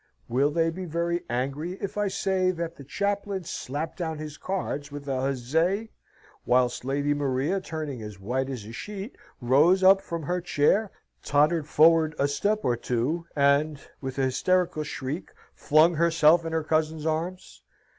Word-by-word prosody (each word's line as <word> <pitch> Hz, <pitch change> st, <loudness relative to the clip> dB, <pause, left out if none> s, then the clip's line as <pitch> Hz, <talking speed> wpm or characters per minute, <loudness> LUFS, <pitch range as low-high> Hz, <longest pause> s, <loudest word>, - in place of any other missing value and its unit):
Will 135 Hz, +4 st, +2 dB
they 165 Hz, +2 st, +1 dB
be 185 Hz, +2 st, -6 dB
very 170 Hz, +1 st, -1 dB
angry 140 Hz, +8 st, -2 dB
if 195 Hz, +1 st, -6 dB
I 205 Hz, 0 st, 0 dB
say 190 Hz, -1 st, 0 dB
that 170 Hz, -2 st, -3 dB
the 140 Hz, -, -11 dB
chaplain 200 Hz, +4 st, -2 dB
slapped 155 Hz, -1 st, -5 dB
down 160 Hz, -3 st, -2 dB
his 150 Hz, -1 st, -7 dB
cards 150 Hz, -6 st, -4 dB
with 145 Hz, 0 st, -8 dB
a 130 Hz, -2 st, -1 dB
huzzay, 160 Hz, -, 0 dB, 0.5 s
whilst 125 Hz, 0 st, +2 dB
Lady 140 Hz, +2 st, 0 dB
Maria, 145 Hz, +6 st, 0 dB
turning 155 Hz, -8 st, -5 dB
as 105 Hz, -2 st, -8 dB
white 130 Hz, +7 st, -2 dB
as 125 Hz, -6 st, -5 dB
a 110 Hz, -, -9 dB
sheet, 205 Hz, -, -7 dB, 0.3 s
rose 150 Hz, +10 st, +4 dB
up 195 Hz, +1 st, +7 dB
from 170 Hz, -1 st, -5 dB
her 180 Hz, +4 st, -1 dB
chair, 180 Hz, +6 st, +2 dB, 0.3 s
tottered 150 Hz, +2 st, +2 dB
forward 155 Hz, 0 st, +4 dB
a 140 Hz, -, +2 dB
step 205 Hz, +9 st, 0 dB
or 120 Hz, -, +2 dB
two, 125 Hz, +9 st, -2 dB
and, 140 Hz, +1 st, +3 dB, 0.2 s
with 130 Hz, -1 st, -5 dB
an 135 Hz, -, +1 dB
hysterical 170 Hz, +5 st, +1 dB
shriek, 150 Hz, +2 st, -5 dB, 0.2 s
flung 155 Hz, +3 st, +4 dB
herself 165 Hz, 0 st, +4 dB
in 165 Hz, -, -3 dB
her 160 Hz, -1 st, 0 dB
cousin's 155 Hz, 0 st, 0 dB
arms? 165 Hz, +4 st, -3 dB
155 Hz, 165 wpm, -26 LUFS, 140-175 Hz, 0.5 s, up